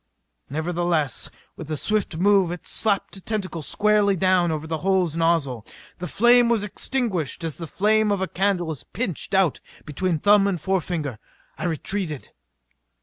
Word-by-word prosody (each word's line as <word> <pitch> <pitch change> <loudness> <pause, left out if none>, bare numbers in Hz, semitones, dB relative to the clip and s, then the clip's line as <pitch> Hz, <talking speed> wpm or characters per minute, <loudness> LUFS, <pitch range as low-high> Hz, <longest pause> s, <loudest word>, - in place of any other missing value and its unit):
Nevertheless 160 -2 -1 0.3
with 160 - -9
a 155 - -2
swift 210 -2 -1
move 195 0 +4
it 175 - -7
slapped 200 -2 0
a - - -11
tentacle 190 -5 -3
squarely 210 +4 +2
down 185 -1 +2
over 155 0 -3
the 160 0 -3
hose 185 -3 +1
nozzle. 165 -9 +1 0.4
The 180 - -4
flame 240 +3 +5
was 230 -3 +2
extinguished 205 - -2
as 165 -1 -4
the 165 - -5
flame 215 +4 +2
of 200 - +1
a 190 - -1
candle 185 -4 0
is 150 - -7
pinched 195 - -3
out 190 -6 +3 0.3
between 165 +3 -1
thumb 205 +4 +4
and 185 -4 -1
forefinger. 165 - -2 0.4
I - - -5
retreated. 165 -2 -3
180 Hz, 155 wpm, -23 LUFS, 160-200 Hz, 0.4 s, flame